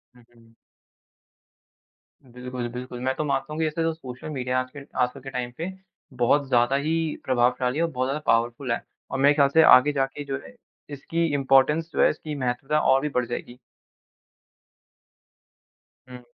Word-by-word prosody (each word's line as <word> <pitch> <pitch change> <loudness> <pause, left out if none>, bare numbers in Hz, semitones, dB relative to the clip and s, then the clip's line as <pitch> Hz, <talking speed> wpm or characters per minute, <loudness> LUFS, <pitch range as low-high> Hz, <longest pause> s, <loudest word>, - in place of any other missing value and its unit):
हुँ, 125 - -19
हुँ। 115 -1 -22 1.7
बिल्कुल, 125 0 -6
बिल्कुल। 125 0 -7
मैं 130 +1 0
तो - - -2
मानता 145 +1 -2
हूँ 155 - -5
कि 160 - +2
ऐसे 155 +2 -2
तो 165 0 0
सोशल 130 -3 -9
मीडिया 130 -3 -1
आज 130 0 -4
के - - -6 0.2
आजकल 125 +2 -1
के 135 - -8
टाइम 125 -2 -4
पे 170 +4 -4 0.5
बहुत 135 +4 +2
ज़्यादा 120 +1 +3
ही 145 +3 -1 0.3
प्रभावशाली 125 +2 +1
और 170 - +1
बहुत 130 -2 -1
ज़्यादा 140 +3 -2
पॉवरफुल 120 +2 +1
है। 115 - -1 0.3
और 135 - -2
मेरे 140 +2 +5
ख्याल 140 -2 +5
से 160 +3 +5
आगे 145 -1 +7
जाके 135 +1 -2 0.7
इसकी 165 +4 -2
इम्पोर्टेंस 140 +4 +3
जो - - +1
है, - - +6
इसकी 155 0 -5
महत्वता 135 +3 -1
और 135 -2 +3
भी 150 - -2
बढ़ 125 -1 +2
जाएगी। 120 +1 -6 2.5
हुँ। 125 -1 -11
135 Hz, 165 wpm, -25 LUFS, 125-150 Hz, 2.5 s, आगे